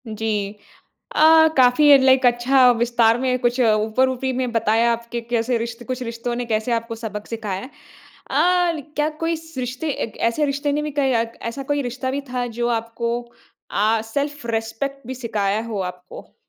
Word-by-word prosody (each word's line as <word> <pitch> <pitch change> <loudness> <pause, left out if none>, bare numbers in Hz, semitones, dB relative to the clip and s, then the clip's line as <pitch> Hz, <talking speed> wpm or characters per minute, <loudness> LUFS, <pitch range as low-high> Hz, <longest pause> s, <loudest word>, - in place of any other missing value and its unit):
जी। 215 -2 -2 0.6
अ, - - +4 0.3
काफ़ी 255 +3 +5
एक 275 -1 +8
लाइक 260 0 +4
अच्छा 250 +2 +5
विस्तार 235 -1 +3
में 255 -1 +1
कुछ 240 +1 0
ऊपर 220 +3 +2
ऊपरी 260 +1 -2
में 250 -1 -2
बताया 230 +1 +2
आपके 235 0 -4
कैसे 235 +1 0
रिश्त 230 +1 -5
कुछ 255 -1 -3
रिश्तों 235 +1 -4
ने 245 0 -3
कैसे 220 +1 -1
आपको 230 0 -2
सबक 210 -2 -6
सिखाया 210 -5 -4
है। 255 - -9 0.6
अ, 355 -1 +3
ल 300 - -6
क्या 300 +1 +2
कोई 330 0 0
स 320 0 -14
रिश्ते 255 +5 -3
ऐसे 230 +2 -1
रिश्ते 285 +1 -1
ने 295 +1 0
भी 300 - -3
कई 270 -1 +2 0.4
ऐसा 275 +4 -6
कोई 290 0 0
रिश्ता 260 +1 -3
भी 275 +2 -2
था 250 -1 -2
जो 240 0 +1
आपको 235 +1 -3 0.5
अ, 220 +2 +2
सेल्फ 285 +3 -3
रिस्पेक्ट 230 +4 -3
भी 260 - -5
सिखाया 215 -4 -1
हो 220 -3 -4
आपको? 180 0 -14
240 Hz, 180 wpm, -21 LUFS, 225-265 Hz, 0.6 s, एक